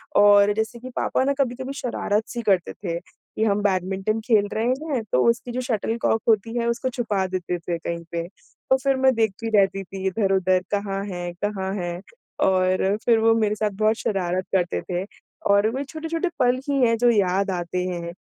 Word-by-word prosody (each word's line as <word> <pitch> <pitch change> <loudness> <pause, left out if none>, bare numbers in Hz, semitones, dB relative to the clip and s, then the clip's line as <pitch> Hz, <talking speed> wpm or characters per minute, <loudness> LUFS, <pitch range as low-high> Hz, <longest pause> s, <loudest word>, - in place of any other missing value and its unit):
और 205 0 +6
जैसे 220 +2 -3
कि 255 +2 -8
पापा - - +1
ना 280 +1 +2
कभी-कभी 260 +1 -1
शरारत-सी 235 -3 -2
करते 195 -6 +1
थे 170 -4 -4
कि 200 +4 -7
हम 205 -1 +2
बैडमिंटन 190 +2 0
खेल 210 -3 +4
रहे 220 - 0
हैं, 265 -2 -1
तो 125 - +3
उसकी 235 +1 -1
जो 250 +1 -2
शटल 230 -2 -1
कॉक 225 - +2
होती 225 +1 +2
है 235 0 0
उसको 235 +2 -1
छुपा 210 -5 0
देते 180 -1 -3
थे 170 0 -3
कहीं 170 0 -5
पे, 170 0 -2
तो 260 +6 -3
फिर 275 -1 +3
मैं 260 0 +4
देखती 225 0 -1
रहती 195 0 +2
थी 190 0 -7
इधर-उधर 190 -2 +2
कहाँ 200 -1 -1
है 175 -3 -5
कहाँ 195 -2 -2
है? 175 -2 -4 0.4
और 185 +1 +2
फिर, 230 -2 +5
वो 225 0 +4
मेरे 215 -2 +1
साथ 215 0 0
बहुत 220 +1 +4
शरारत 185 -2 -1
करते 175 - 0
थे 180 +1 -1 0.5
और 200 +1 +5
वही 265 +5 -3
छोटे-छोटे 325 +4 -3
पल 250 0 +3
ही 280 -1 +1
हैं, 230 -1 +3
जो 240 +1 +4
याद 200 -2 +2
आते 180 0 -2
हैं 170 -1 -4
205 Hz, 190 wpm, -23 LUFS, 185-235 Hz, 0.5 s, और